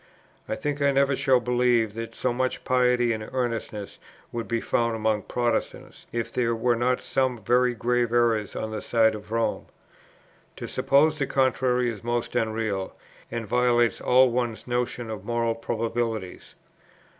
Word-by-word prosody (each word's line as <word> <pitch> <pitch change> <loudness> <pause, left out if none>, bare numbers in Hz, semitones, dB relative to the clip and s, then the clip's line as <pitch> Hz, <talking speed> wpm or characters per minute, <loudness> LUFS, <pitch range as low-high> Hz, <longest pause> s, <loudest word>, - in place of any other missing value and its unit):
I - - 0
think 145 -1 -3
I 140 0 +4
never 140 0 +2
shall 130 -1 +3
believe 120 -3 +2
that 115 +1 -6
so 125 - -1
much 130 +1 -2
piety 125 -2 +2
and 110 -1 -6
earnestness 115 -5 -3 0.3
would 115 -1 -4
be 115 0 0
found 115 0 0
among 110 -1 0
Protestants, 120 +3 -3
if 115 -1 -3
there 115 -2 +1
were 120 +1 +1
not 125 +2 +1
some 130 -2 0
very 125 +3 +2
grave 120 0 0
errors 115 -4 +1
on 110 - -4
the 110 - -4
side 110 -2 +3
of 105 0 -9
Rome. 115 0 -1 0.9
To - - -6
suppose 150 +3 +2
the 135 - 0
contrary 130 -2 +1
is 105 -2 -10
most 120 0 -2
unreal, 110 -4 -1 0.3
and 115 -1 -4
violates 120 +1 +2
all 125 0 +5
one's 120 -2 -2
notions 120 -1 -2
of 105 -4 -6
moral 115 +1 0
probabilities. 115 -3 -3
120 Hz, 155 wpm, -25 LUFS, 115-125 Hz, 0.9 s, all